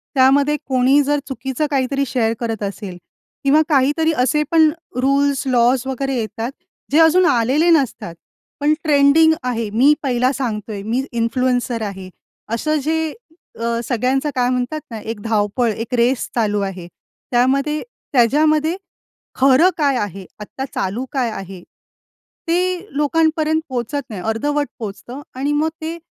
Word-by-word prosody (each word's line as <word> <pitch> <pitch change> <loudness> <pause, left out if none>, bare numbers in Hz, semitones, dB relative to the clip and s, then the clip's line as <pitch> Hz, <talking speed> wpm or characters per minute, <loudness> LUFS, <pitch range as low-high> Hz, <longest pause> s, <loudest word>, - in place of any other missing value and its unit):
त्यामध्ये 280 +3 +4
कोणी 265 +2 +3
जर 290 +1 +1
चुकीचं 265 +2 -3
काही 265 -2 +1
तरी 275 0 0
शेअर 230 -3 0
करत 225 -3 -3
असेल 200 -2 -5 0.5
किंवा 285 +3 +4
काही 275 -2 +4
तरी 320 0 +2
असे 300 +3 +2
पण 320 -2 +5 0.3
रूल्स, 275 +1 +2
लॉज 245 0 +3
वगैरे 270 +1 -2
येतात, 225 +1 -3 0.4
जे 305 - +4
अजून 325 +3 +5
आलेले 280 +3 +2
नसतात, 265 - 0 0.4
पण 295 +1 +3
ट्रेंडिंग 305 +1 +5
आहे. 230 -3 -2
मी 250 +8 +4
पहिला 255 -1 +1
सांगतो 225 -6 -3
आहे, 205 -2 -5
मी 240 +5 -1
इन्फ्लुएन्सर 245 0 0
आहे, 190 -3 -6 0.4
असं 305 +7 0
जे 320 0 0 0.5
अ, - - -4 0.2
सगळ्यांचं 255 +5 0
काय 250 -1 +2
म्हणतात 255 +5 -2
ना, 225 - -5
एक 225 0 -6
धाव-पळ, 220 +2 0
एक 225 +3 -6
रेस 240 +1 +2 0.2
चालू 210 -3 +1
आहे. 185 -3 -7 0.4
त्यामध्ये 275 +5 +1 0.3
त्याज्यामध्ये 305 +6 +3 0.6
खरं 270 +7 +5
काय 285 -4 +2
आहे, 195 -3 -4
आत्ता 235 +6 -6
चालू 195 +6 -2
काय 255 -4 0
आहे, 190 -3 -8 0.9
ते 360 +3 0
लोकांपर्यंत 315 +1 +1
पोहचत 255 +3 -2
नाही. 205 -5 -6
अर्धवट 290 +6 -1
पोहोचतं 235 +5 -7
आणि 275 +3 -1
मग 305 +2 +1
ते, 325 +2 -4
260 Hz, 145 wpm, -19 LUFS, 230-295 Hz, 0.9 s, पण